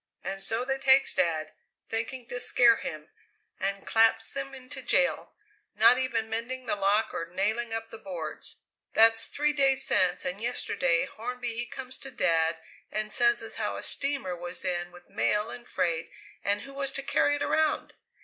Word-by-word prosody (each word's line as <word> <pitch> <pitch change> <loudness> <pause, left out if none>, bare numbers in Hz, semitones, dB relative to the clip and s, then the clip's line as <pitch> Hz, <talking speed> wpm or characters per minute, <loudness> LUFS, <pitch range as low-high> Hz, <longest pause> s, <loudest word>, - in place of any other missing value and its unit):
And 195 0 -4
so 225 +5 -1
they 270 0 -1
takes 270 0 +5
Dad, 160 -4 0 0.4
thinking 235 +3 -3
to 245 - -4
scare 235 -1 +5
him, 155 0 -7 0.5
and 195 +1 -2
claps 225 +1 +3
him 275 0 -3
into 265 +1 -6
jail, 265 +2 +1 0.4
not 225 +4 +6
even 230 -4 -1
mending 235 +3 -4
the - - 0
lock 205 +2 +1
or 165 - -4
nailing 220 +6 -1
up 225 0 -4
the 225 - -10
boards. 175 -7 -7 0.4
That's 225 0 +5
three 300 +1 0
days 270 -2 +3
since, 180 -1 +2
and 180 +3 -3
yesterday 250 +2 0
Hornby 245 -1 -5
he 240 +1 -3
comes 265 -2 -7
to 270 - -5
Dad 165 -7 +1 0.3
and 215 +1 -3
says 240 -1 +3
as 225 - -7
how - - -2
a - - -6
steamer 275 -10 +2
was 175 +1 -5
in 175 -1 -2
with 175 0 -16
mail 210 +2 0
and 240 - -10
freight 165 -1 -1 0.3
and 205 +1 +1
who 275 - -11
was 275 0 -2
to 275 - -1
carry 290 +1 +2
it 290 - -2
around? 315 -1 0
225 Hz, 180 wpm, -28 LUFS, 195-260 Hz, 0.5 s, not